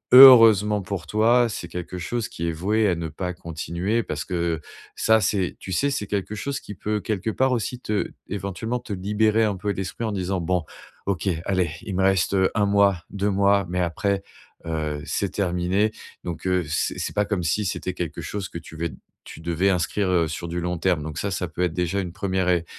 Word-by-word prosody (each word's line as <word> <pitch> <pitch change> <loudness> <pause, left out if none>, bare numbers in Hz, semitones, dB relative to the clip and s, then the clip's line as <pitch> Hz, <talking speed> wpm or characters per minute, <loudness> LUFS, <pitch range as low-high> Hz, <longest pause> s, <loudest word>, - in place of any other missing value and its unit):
heureusement 115 -6 +9
pour 95 -4 -5
toi, 120 +4 +4
c'est 95 -5 -5
quelque 90 +1 -6
chose 110 +6 -3
qui 85 - -4
est - - +1
voué 105 +7 +1
à 95 - +3
ne 85 -1 -3
pas 90 +4 -4
continuer 85 +6 -2
parce 75 -5 -4
que 85 -2 -1 0.3
ça 110 0 +4
c'est, 95 -2 0
tu 95 - -8
sais, 140 +10 +2
c'est 135 -7 -2
quelque 100 +1 -2
chose 140 +6 -3
qui 105 - -9
peut 105 +3 -2
quelque 110 +1 -2
part 130 +3 +2
aussi, 125 0 -1
te, 105 -4 -1 0.2
éventuellement, 100 +4 -3
te 115 -3 -6
libérer 105 +3 +2
un 105 -2 +1
peu 100 +2 -2
l'esprit 95 +4 -4
en 110 - -1
disant: 95 -1 -1
«Bon 90 0 0 0.4
OK, 100 0 -1 0.2
allez, 95 -5 +1
il 95 - -5
me 95 - +1
reste, 95 0 +2
heu, 95 -1 +4
1 105 - +3
mois, 100 -2 +4
2 100 +1 -1
mois, 100 0 +3
mais 90 +1 -1
après, 100 +3 0 0.4
heu, 80 -2 -2
c'est 85 +7 -1
terminé. 95 +2 +1 0.3
Donc 85 0 -6
heu, 90 -1 +2
c'est 75 - -1
c'est - - -3
pas 105 0 +2
comme 100 -3 -1
si 85 +6 0
c'était 95 0 -2
quelque 85 -3 -4
chose 100 -2 -4
que 85 - -6
tu 80 -1 -12
vais 85 +1 -2 0.3
tu - - -10
devais 85 +3 +1
inscrire, 95 +2 0
heu, 85 -3 +3
sur 80 +2 -5
du 85 +1 -2
long 90 0 -2
terme. 90 -2 +1
Donc 75 0 -6
ça, 100 - -2
ça 90 -1 -2
peut 85 +1 -6
être 90 -2 0
déjà 90 +3 0
une 90 -2 -5
1ere 95 -1 -1
ré 85 -2 +2
95 Hz, 215 wpm, -24 LUFS, 85-105 Hz, 0.4 s, heureusement